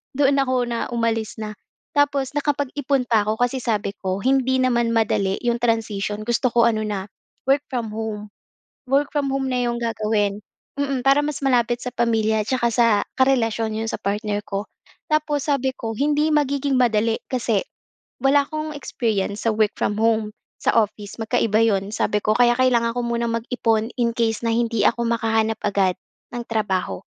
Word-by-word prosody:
Doon 280 Hz, 0 st, +3 dB
ako 260 Hz, -1 st, +1 dB
na 235 Hz, -1 st, -2 dB
umalis 225 Hz, -2 st, -1 dB
na. 215 Hz, -1 st, -6 dB, 0.3 s
Tapos 285 Hz, -3 st, +1 dB
nakapag-ipon 285 Hz, -2 st, 0 dB
pa 220 Hz, -3 st, +3 dB
ako. 215 Hz, -, +1 dB
Kasi 255 Hz, +2 st, 0 dB
sabi 215 Hz, -5 st, -1 dB
ko, 190 Hz, +2 st, -3 dB
"Hindi 260 Hz, 0 st, +2 dB
naman 235 Hz, -2 st, +1 dB
madali 200 Hz, -3 st, +1 dB
'yong 235 Hz, 0 st, +1 dB
transition." 215 Hz, -3 st, -1 dB
Gusto 240 Hz, +3 st, +1 dB
ko 235 Hz, -1 st, +3 dB
ano 220 Hz, -2 st, +1 dB
na, 200 Hz, -2 st, -3 dB, 0.5 s
work 280 Hz, +1 st, +2 dB
from 235 Hz, -5 st, -3 dB
home. 215 Hz, -1 st, -5 dB, 0.6 s
Work 280 Hz, +2 st, +2 dB
from 290 Hz, -2 st, 0 dB
home 270 Hz, -1 st, -1 dB
na 250 Hz, -, 0 dB
'yong 235 Hz, -, -1 dB
gagawin. 215 Hz, -3 st, -1 dB, 0.4 s
Mm, 275 Hz, -3 st, -1 dB
para 275 Hz, +1 st, +5 dB
mas 290 Hz, -1 st, -3 dB
malapit 245 Hz, -2 st, +1 dB
sa 250 Hz, -, -4 dB
pamilya 220 Hz, -2 st, +1 dB
tsaka 235 Hz, -3 st, +1 dB
sa 235 Hz, 0 st, +4 dB, 0.3 s
karelasyon, 225 Hz, -4 st, +2 dB
'yon 225 Hz, 0 st, -2 dB
sa -, -, -4 dB
partner 205 Hz, +1 st, -1 dB
ko. 200 Hz, 0 st, -2 dB, 0.5 s
Tapos 300 Hz, -2 st, +1 dB
sabi 265 Hz, -2 st, 0 dB
ko, 225 Hz, -1 st, -4 dB
"Hindi 295 Hz, +5 st, +1 dB
magiging 280 Hz, -2 st, +1 dB
madali 225 Hz, -1 st, +2 dB
kasi 230 Hz, -6 st, 0 dB, 0.6 s
wala 275 Hz, +2 st, +4 dB
akong 310 Hz, +1 st, -5 dB
experience 215 Hz, -6 st, -2 dB
sa 220 Hz, -, +2 dB
work 215 Hz, -1 st, +2 dB
from 205 Hz, -, 0 dB
home, 220 Hz, -1 st, +1 dB, 0.2 s
sa -, -, +1 dB
office. 210 Hz, -2 st, 0 dB
Magkaiba 225 Hz, -1 st, +2 dB
'yon," 205 Hz, -1 st, 0 dB
sabi 210 Hz, 0 st, +1 dB
ko. 215 Hz, +1 st, +1 dB
Kaya 240 Hz, 0 st, +4 dB
kailangan 235 Hz, -2 st, +3 dB
ko 245 Hz, -, -3 dB
munang 235 Hz, -1 st, -1 dB
mag-ipon, 225 Hz, -2 st, 0 dB
in 235 Hz, -2 st, +1 dB
case 230 Hz, -1 st, -1 dB
na 230 Hz, -, +1 dB
hindi 230 Hz, -2 st, +1 dB
ako 235 Hz, 0 st, +2 dB
makahanap 225 Hz, -1 st, +1 dB
agad 195 Hz, -3 st, +1 dB, 0.4 s
ng 240 Hz, -, -3 dB
trabaho. 190 Hz, -, -1 dB
230 Hz, 170 wpm, -22 LUFS, 215-260 Hz, 0.6 s, para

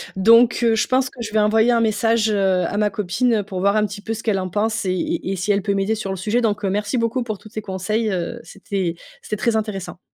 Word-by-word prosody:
Donc, 230 Hz, +5 st, +5 dB
heu, 230 Hz, -1 st, +4 dB
je 220 Hz, -, +1 dB
pense 260 Hz, 0 st, +1 dB
que 265 Hz, -3 st, -11 dB
je 220 Hz, -2 st, -5 dB
vais 220 Hz, -, 0 dB
envoyer 220 Hz, +3 st, +3 dB
un 235 Hz, -, +3 dB
message, 225 Hz, 0 st, +2 dB
heu, 190 Hz, -3 st, +2 dB
à 200 Hz, -, -3 dB
ma 210 Hz, 0 st, +2 dB
copine, 210 Hz, +5 st, 0 dB
heu, -, -, -7 dB
pour 190 Hz, -2 st, -6 dB
voir 200 Hz, +2 st, +2 dB
un 215 Hz, 0 st, +3 dB
petit 205 Hz, 0 st, -7 dB
peu 225 Hz, +2 st, -4 dB
ce 225 Hz, -, -8 dB
qu'elle 210 Hz, -4 st, +1 dB
en 185 Hz, 0 st, -3 dB
pense 215 Hz, +4 st, -1 dB
et -, -, 0 dB
et 185 Hz, +1 st, -2 dB
et -, -, -2 dB
si 190 Hz, +3 st, -1 dB
elle 200 Hz, 0 st, +2 dB
peut 200 Hz, +1 st, -1 dB
m'aider 195 Hz, +2 st, 0 dB
sur 210 Hz, -3 st, -4 dB
le 190 Hz, -, -3 dB
sujet. 215 Hz, +6 st, 0 dB
Donc, 210 Hz, -2 st, 0 dB
heu, 190 Hz, -, 0 dB
merci 205 Hz, +4 st, -1 dB
beaucoup 230 Hz, +2 st, 0 dB
pour 220 Hz, -3 st, -4 dB
tous 215 Hz, -, -15 dB
ces 215 Hz, 0 st, -5 dB
conseils, 210 Hz, +3 st, -2 dB
heu, 185 Hz, +6 st, -3 dB
c'était 190 Hz, -7 st, -4 dB, 0.3 s
c'était 215 Hz, -, -4 dB
très 230 Hz, +2 st, +1 dB
intéressant. 210 Hz, -5 st, -3 dB
210 Hz, 280 wpm, -21 LUFS, 195-225 Hz, 0.3 s, Donc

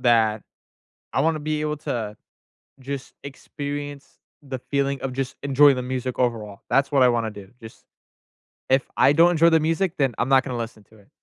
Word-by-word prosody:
that. 110 Hz, -3 st, +3 dB, 0.7 s
I -, -, +1 dB
wanna 160 Hz, 0 st, +1 dB
be 155 Hz, 0 st, -2 dB
able 150 Hz, 0 st, -1 dB
to 115 Hz, -8 st, -4 dB, 0.7 s
just 135 Hz, 0 st, -6 dB
experience 145 Hz, 0 st, -7 dB, 0.2 s
the 135 Hz, -2 st, -6 dB
feeling 140 Hz, +1 st, -1 dB
of 135 Hz, -1 st, -4 dB
just 135 Hz, -1 st, -3 dB
enjoy 140 Hz, +1 st, +5 dB
the 125 Hz, -, -3 dB
music 130 Hz, 0 st, -4 dB
overall, 110 Hz, -5 st, -2 dB
that's 140 Hz, +1 st, +2 dB
what 135 Hz, -2 st, +4 dB
I 125 Hz, -, +6 dB
wanna 115 Hz, -2 st, 0 dB
do, 100 Hz, -2 st, -12 dB
just 110 Hz, 0 st, -13 dB, 0.8 s
if 130 Hz, +1 st, +4 dB
I 140 Hz, -, +5 dB
don't 170 Hz, +3 st, +5 dB
enjoy 165 Hz, 0 st, +5 dB
the 160 Hz, -1 st, +4 dB
music, 165 Hz, +3 st, 0 dB
then 135 Hz, -4 st, +1 dB
I'm -, -, 0 dB
not 135 Hz, -2 st, +4 dB
gonna 125 Hz, -3 st, -4 dB
listen 115 Hz, -2 st, -6 dB
to 110 Hz, -, -22 dB
it. 100 Hz, -, -22 dB
135 Hz, 185 wpm, -23 LUFS, 120-145 Hz, 0.8 s, I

